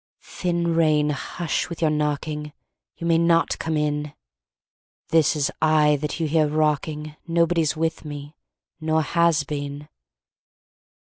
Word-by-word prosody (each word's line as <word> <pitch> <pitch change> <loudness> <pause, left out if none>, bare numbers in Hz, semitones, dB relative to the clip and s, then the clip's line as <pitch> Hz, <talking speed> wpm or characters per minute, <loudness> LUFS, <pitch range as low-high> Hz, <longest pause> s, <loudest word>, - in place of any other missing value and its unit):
"Thin 170 -2 -1
Rain, 155 -2 +3
hush 160 +4 -3
with 170 - -7
your 160 -2 +2
knocking! 150 0 -2 0.4
You 170 - -6
may 165 -1 +3
not 170 0 +2
come 160 -1 -1
in! 150 -1 -2 0.9
This 160 -1 +3
is 145 -2 0
I 155 -1 +4
that 150 +3 -4
you 160 - 0
hear 155 0 +3
rocking; 150 0 -1
Nobody's 170 -2 +2
with 165 0 -1
me, 145 0 -8 0.4
nor 160 0 +1
has 170 0 +2
been!" 145 0 -5
155 Hz, 130 wpm, -23 LUFS, 150-165 Hz, 0.9 s, I